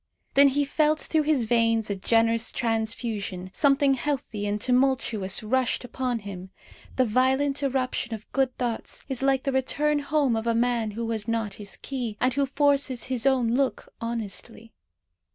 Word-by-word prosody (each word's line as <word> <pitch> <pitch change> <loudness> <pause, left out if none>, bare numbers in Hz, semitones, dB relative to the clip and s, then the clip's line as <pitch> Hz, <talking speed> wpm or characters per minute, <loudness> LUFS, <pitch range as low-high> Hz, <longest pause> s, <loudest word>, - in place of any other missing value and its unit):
Then 280 +1 +7
he 285 +1 +1
felt 305 +2 +2
through 315 - +1
his 295 -5 +1
veins 230 -2 +2
a - - -1
generous 230 +3 +2
transfusion. 220 -5 -2
Something 280 -1 +3
healthy 250 -6 -3
and 205 +1 -1
tumultuous 250 -6 +1
rushed 255 +4 0
upon 250 0 -2
him. 190 -2 -8 0.5
The 255 - +3
violent 265 +5 +1
irruption 255 -3 -1
of 215 - -12
good 265 -2 0
thoughts 240 -3 -4
is 265 -2 -3
like 270 -1 +2
the 275 - 0
return 290 +3 +1
home 285 -4 +1
of 225 +1 -3
a 230 - +2
man 235 -2 +1
who 230 0 -2
has 220 -1 -2
not 225 -3 -1
his 200 - -7
key, 245 -6 -3
and 255 0 +2
who 280 +1 +1
forces 280 -3 +2
his 250 +1 +1
own 255 -4 +2
look 270 +1 -1
honestly. 230 0 -5
245 Hz, 165 wpm, -26 LUFS, 225-275 Hz, 0.5 s, Then